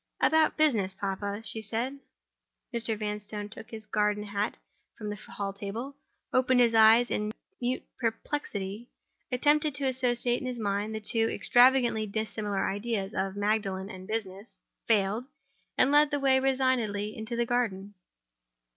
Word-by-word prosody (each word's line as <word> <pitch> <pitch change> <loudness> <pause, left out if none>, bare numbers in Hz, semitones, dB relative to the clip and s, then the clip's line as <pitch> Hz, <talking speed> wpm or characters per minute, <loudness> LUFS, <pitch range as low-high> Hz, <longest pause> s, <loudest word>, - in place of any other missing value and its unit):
"About 315 0 +3
business, 220 -12 +2
papa," 200 +2 -3
she 220 - -4
said. 235 +6 -3 0.7
Mr. 230 -2 -1
Vanstone 210 0 -4
took 220 - -10
his 220 -1 -8
garden 210 0 0
hat 205 +1 -2 0.4
from 210 -1 -5
the - - -4
hall 200 -1 -5
table—opened 255 +4 -2
his 235 -2 +4
eyes 225 +2 +6
in 210 0 -1 0.3
mute 245 +1 -1 0.2
perplexity—attempted 250 +5 -2
to 280 -1 -2
associate 245 -2 +1
in 255 - -4
his 250 -1 -4
mind 205 0 -1
the - - -2
two 225 +1 +1
extravagantly 245 -3 +4
dissimilar 210 -1 -2
ideas 205 0 -2
of 195 0 -2
Magdalen 205 -2 -1
and 185 0 -10
"business"—failed—and 215 +4 -2
led 295 0 +6
the 290 -1 -1
way 265 -1 +4
resignedly 255 -6 0
into 220 +2 -5
the 235 0 +1
garden. 205 -5 -1
220 Hz, 130 wpm, -29 LUFS, 205-250 Hz, 0.7 s, eyes